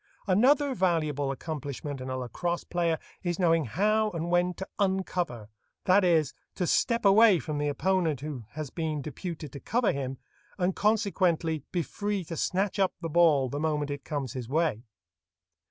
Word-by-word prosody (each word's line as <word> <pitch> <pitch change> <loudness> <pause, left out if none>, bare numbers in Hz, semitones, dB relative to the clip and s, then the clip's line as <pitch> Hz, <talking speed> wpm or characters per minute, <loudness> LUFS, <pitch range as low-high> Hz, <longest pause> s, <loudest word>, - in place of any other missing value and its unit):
Another 265 +8 +4
valuable 155 - 0
accomplishment 145 -1 -5
in 130 - -5
a 130 - -2
lacrosse 170 +8 -3
player 170 -2 0 0.2
is 175 -2 -2
knowing 165 -4 +3
how 215 - +2
and 170 -2 -4
when 175 0 +2
to 190 - -6
"uncover"—that 180 - 0
is, 165 -5 +3 0.2
to 180 - -1
stop 235 +6 +1
away 205 0 +7
from 155 -2 -4
the 145 - 0
opponent 160 -1 0
who 140 -6 -6
has 155 -3 -5
been 155 -4 -3
deputed 155 -1 -6
to 140 - -8
cover 235 - +1
him, 135 -1 -4 0.4
and 180 -1 0
consequently 185 -7 +1
be 175 -2 0
free 205 +3 -3
to 165 0 -6
snatch 190 +5 0
up 190 -1 +2
the 165 - -3
ball 155 -5 +4
the 145 +3 -4
moment 150 -2 -1
it 140 -1 -5
comes 140 -5 -4
his 125 -3 -6
way. 150 -6 +1
165 Hz, 165 wpm, -28 LUFS, 145-190 Hz, 0.4 s, away